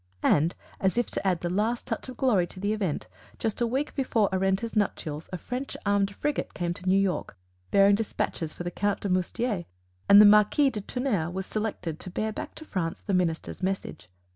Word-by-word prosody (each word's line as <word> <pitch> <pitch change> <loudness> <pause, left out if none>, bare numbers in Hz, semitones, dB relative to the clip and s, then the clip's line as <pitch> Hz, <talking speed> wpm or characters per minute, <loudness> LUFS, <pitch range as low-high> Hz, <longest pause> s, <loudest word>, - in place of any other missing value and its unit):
And, 160 +4 +3 0.2
as 190 +3 +1
if 240 - +1
to - - -1
add 180 -3 +1
the 175 - -1
last 220 +5 0
touch 230 +2 -4
of 255 - -8
glory 210 -10 +3
to 185 - -11
the 205 +2 0
event, 190 - -2 0.3
just 220 +1 -2
a 235 - +3
week 265 +5 -1
before 230 -7 +1
Arenta's 195 +4 0
nuptials 160 -7 -1
a 185 - -3
French 250 +9 -5
armed 200 -1 +1
frigate 295 +5 -2
came 175 -1 -1
to 185 +1 -4
New 190 - +5
York 190 - -1 0.3
bearing 200 0 +5
despatches 200 -6 -1
for 175 - -7
the 175 - -3
Count 205 +2 -1
de 200 - -2
Moustier; 185 +2 0 0.4
and 200 - +10
the 210 - +10
Marquis 210 +7 +5
de 210 - -4
Tounnerre 210 -8 -1
was 190 +2 -4
selected 195 -8 -3
to - - -7
bear 215 +4 -2
back - - -6
to 315 - -10
France 180 - -3
the 200 - -3
Minister's 175 -2 -1
Message. 190 - -3
200 Hz, 205 wpm, -27 LUFS, 180-220 Hz, 0.4 s, and